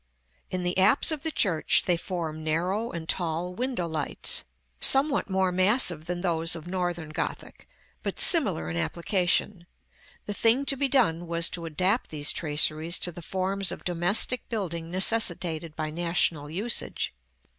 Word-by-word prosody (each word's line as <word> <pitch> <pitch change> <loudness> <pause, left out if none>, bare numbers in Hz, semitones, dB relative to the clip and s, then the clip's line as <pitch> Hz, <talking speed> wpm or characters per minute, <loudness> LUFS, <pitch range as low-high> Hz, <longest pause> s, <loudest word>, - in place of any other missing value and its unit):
In 185 -1 -3
the 180 +1 0
apse 215 - +5
of 305 -3 -3
the 320 - -1
church 185 - +2
they 180 - +3
form 165 -3 -5
narrow 180 +9 -1
and 165 -5 -7
tall 175 +1 -2
window 245 -4 -3
lights, 155 -3 +1 0.4
somewhat 275 -3 +4
more 190 -1 +1
massive 185 - +3
than 175 0 -4
those 165 -2 +1
of 165 -1 -9
Northern 175 -3 -3
Gothic, 155 - -6 0.3
but - - -5
similar 80 - +2
in 85 0 -4
application: 175 - -1 0.6
the 205 - -4
thing 235 +6 +2
to 275 - +1
be 275 +1 0
done 190 - +1
was 170 0 +1
to 170 -2 -6
adapt 185 +9 0
these 150 -1 0
traceries 155 +2 0
to 175 - -2
the 175 - -10
forms 190 +2 -1
of - - -8
domestic 180 +8 +1
building 170 -8 -4
necessitated 175 -5 +1
by 155 -1 -4
national 170 -3 -1
usage. 205 +9 -1
175 Hz, 155 wpm, -26 LUFS, 165-200 Hz, 0.6 s, apse